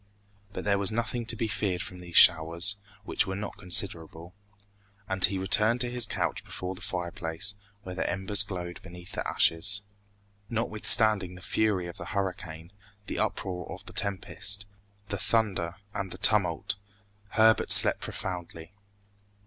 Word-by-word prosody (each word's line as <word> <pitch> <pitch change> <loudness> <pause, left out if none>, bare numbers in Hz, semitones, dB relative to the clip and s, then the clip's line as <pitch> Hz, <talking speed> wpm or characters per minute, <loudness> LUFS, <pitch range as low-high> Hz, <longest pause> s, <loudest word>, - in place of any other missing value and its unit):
But - - -6
there 100 -1 +1
was 100 0 +1
nothing 115 +1 -3
to 115 - +2
be 115 0 -2
feared 95 -3 -1
from 90 - -8
these 90 -1 -4
showers, 85 +4 +5 0.3
which 105 - 0
were 95 - -3
not 100 +1 -6
considerable, 85 -2 0 0.7
and 95 -1 -3
he 95 - +3
returned 105 +5 +1
to 120 -1 -1
his 120 -3 +3
couch - - -2
before 90 0 -6
the 90 - -11
fireplace, 85 +1 -1 0.3
where 90 - -7
the 90 - -2
embers 100 +1 +2
glowed 90 -4 -4
beneath 90 0 -12
the - - -4
ashes. 100 +5 +2 0.7
Notwithstanding 110 -4 +3
the 90 - -12
fury 105 -5 0
of 85 - -9
the 85 - -7
hurricane, 85 -3 -5 0.3
the - - -5
uproar 90 -2 -3
of - - -9
the - - -10
tempest, 100 0 0 0.4
the 100 - -4
thunder, 95 -6 -1 0.2
and 95 -1 -4
the 90 - -7
tumult, 100 -2 +2 0.6
Herbert 110 0 +3
slept - - +8
profoundly. 85 -1 -7
95 Hz, 150 wpm, -28 LUFS, 90-105 Hz, 0.7 s, slept